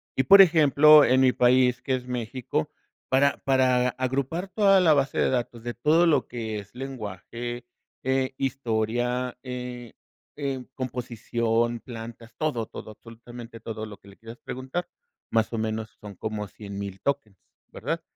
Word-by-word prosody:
Y, 130 Hz, -, +2 dB
por 195 Hz, +9 st, +9 dB
ejemplo, 155 Hz, -3 st, +7 dB
en 130 Hz, +2 st, +4 dB
mi 130 Hz, -1 st, +5 dB
país, 125 Hz, 0 st, +3 dB
que 130 Hz, -, 0 dB
es 125 Hz, -1 st, -6 dB
México, 125 Hz, -7 st, -3 dB, 0.4 s
para 140 Hz, +2 st, +3 dB
para 130 Hz, -2 st, +3 dB
agrupar 135 Hz, +8 st, -2 dB
toda 195 Hz, -1 st, +4 dB
la 165 Hz, -4 st, +5 dB
base 140 Hz, -1 st, 0 dB
de -, -, +3 dB
datos 120 Hz, -2 st, -2 dB
de 120 Hz, 0 st, -4 dB
todo 155 Hz, +8 st, +3 dB
lo 165 Hz, -3 st, +2 dB
que 110 Hz, -3 st, -4 dB
es 100 Hz, +3 st, -13 dB
lenguaje, 120 Hz, -1 st, -6 dB, 0.4 s
eh, 130 Hz, 0 st, 0 dB
historia, 125 Hz, -1 st, -1 dB
eh, 125 Hz, -2 st, -7 dB, 0.4 s
em, 135 Hz, -3 st, -3 dB
composición, 120 Hz, -2 st, -1 dB
plantas, 115 Hz, -1 st, -10 dB
todo, 125 Hz, -8 st, -1 dB
todo, 110 Hz, -, -9 dB
absolutamente 115 Hz, +1 st, -12 dB
todo 110 Hz, 0 st, -5 dB
lo 105 Hz, -2 st, -10 dB
que 100 Hz, -, -18 dB
le 100 Hz, -, -16 dB
quieras 115 Hz, +1 st, -11 dB
preguntar, 130 Hz, +8 st, -4 dB, 0.4 s
más 110 Hz, +1 st, +1 dB
o -, -, -1 dB
menos 110 Hz, 0 st, -3 dB
son 105 Hz, -1 st, -9 dB
como 105 Hz, +2 st, -4 dB
100,000 100 Hz, -1 st, -7 dB
tokens, 135 Hz, -9 st, -2 dB, 0.3 s
¿verdad? -, -, -3 dB
125 Hz, 150 wpm, -26 LUFS, 115-135 Hz, 0.4 s, por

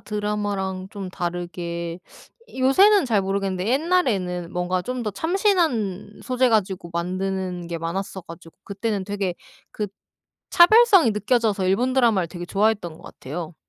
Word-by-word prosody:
드라마랑 205 Hz, -3 st, -3 dB
좀 200 Hz, -3 st, -6 dB
다르게 175 Hz, -1 st, -5 dB, 0.6 s
요새는 380 Hz, +10 st, +5 dB
잘 220 Hz, -6 st, +1 dB
모르겠는데 195 Hz, 0 st, -2 dB
옛날에는 235 Hz, -, 0 dB
뭔가 180 Hz, +1 st, -1 dB
좀 250 Hz, +4 st, -4 dB
더 210 Hz, -, -1 dB
참신한 310 Hz, -, 0 dB
소재 255 Hz, 0 st, +1 dB
가지고 190 Hz, -6 st, 0 dB
만드는 185 Hz, 0 st, -3 dB
게 170 Hz, -1 st, -4 dB
많았어 190 Hz, +4 st, -4 dB
가지고 165 Hz, 0 st, -13 dB
그때는 200 Hz, 0 st, -3 dB
되게 200 Hz, -2 st, -2 dB, 0.4 s
그 210 Hz, -, -3 dB, 0.6 s
차별성이 385 Hz, -, +6 dB
느껴져서 210 Hz, -2 st, +1 dB
일본 240 Hz, +8 st, +1 dB
드라마를 225 Hz, -9 st, +3 dB
되게 175 Hz, 0 st, -7 dB
좋아했던 195 Hz, -4 st, 0 dB
것 -, -, -16 dB
같아요. 160 Hz, +4 st, -8 dB
195 Hz, 320 characters per minute, -23 LUFS, 180-235 Hz, 0.6 s, 차별성이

